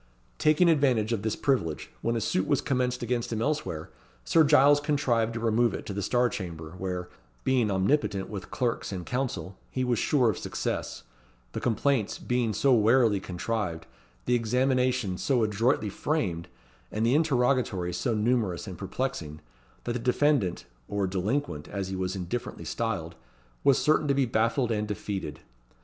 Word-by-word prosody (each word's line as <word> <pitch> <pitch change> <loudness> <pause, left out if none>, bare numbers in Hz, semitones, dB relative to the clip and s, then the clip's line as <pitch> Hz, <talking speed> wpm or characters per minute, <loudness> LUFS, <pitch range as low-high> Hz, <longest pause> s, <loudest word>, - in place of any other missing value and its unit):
Taking 155 +3 +4
advantage 130 -8 +3
of 110 - -1
this 110 0 -1
privilege, 90 - -1
when 115 0 0
a 115 - -1
suit 95 -2 0
was - - +2
commenced 125 -1 -1
against 120 0 -1
him 110 - -1
elsewhere, 115 - -2 0.3
Sir 165 - +5
Giles 145 -1 +6
contrived 125 -6 +1
to - - -2
remove 115 +1 +2
it - - -7
to 100 - -5
the 100 - -3
Star 120 +5 +2
Chamber, 85 -7 -6
where, 90 -1 -3 0.4
being 125 -5 +2
omnipotent 100 0 +1
with 100 -4 -7
clerks 120 -4 -2
and 90 -3 -5
counsel, 125 -7 -3
he 130 - -2
was 125 -3 +1
sure 125 -6 +3
of - - -6
success, - - -3 0.5
the - - -4
complaints 120 -1 +1
being 125 -2 0
so 130 +6 +3
warily 115 -2 +4
contrived, 95 -1 -3 0.4
the - - +1
examinations 125 -3 +1
so 125 -5 +2
adroitly 110 0 +1
framed, 95 - -2 0.4
and 110 +2 0
the 120 - +3
interrogatories 125 - +1
so 110 +6 0
numerous 105 -5 0
and 95 -5 -8
perplexing, 95 - -4 0.4
that 120 - -2
the 125 - -2
defendant, 125 - +1 0.2
or 100 -1 -1
delinquent, 95 - -2
as 100 -2 -4
he 95 - -3
was 95 0 -2
indifferently 95 +6 -4
styled, 100 -8 -2 0.5
was 140 -2 +5
certain 155 0 +2
to 140 - +2
be 135 -1 +3
baffled 115 +2 +1
and 105 -1 -1
defeated. 95 -7 -4
115 Hz, 165 wpm, -28 LUFS, 95-130 Hz, 0.5 s, Giles